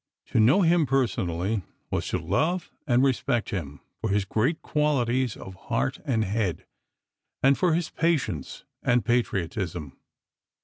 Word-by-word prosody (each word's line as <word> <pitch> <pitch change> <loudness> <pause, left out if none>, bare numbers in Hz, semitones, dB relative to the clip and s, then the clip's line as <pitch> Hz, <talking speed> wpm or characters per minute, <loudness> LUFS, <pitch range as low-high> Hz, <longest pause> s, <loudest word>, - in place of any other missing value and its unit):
To - - +3
know 130 - +5
him 165 -2 +4
personally 105 -6 0 0.3
was - - -1
to - - 0
love 175 +4 0 0.2
and 125 -1 +4
respect 130 -3 +1
him 75 -8 -5 0.2
for - - -2
his 100 0 +1
great 125 - 0
qualities 130 -5 +1
of 95 - -9
heart 115 +7 -2
and 115 -7 +1
head, 100 -3 -1 0.8
and 135 +1 +6
for 175 -1 +2
his 170 0 -2
patience 135 - -1 0.2
and 125 -1 +2
patriotism. 95 - -1
120 Hz, 135 wpm, -26 LUFS, 95-140 Hz, 0.8 s, and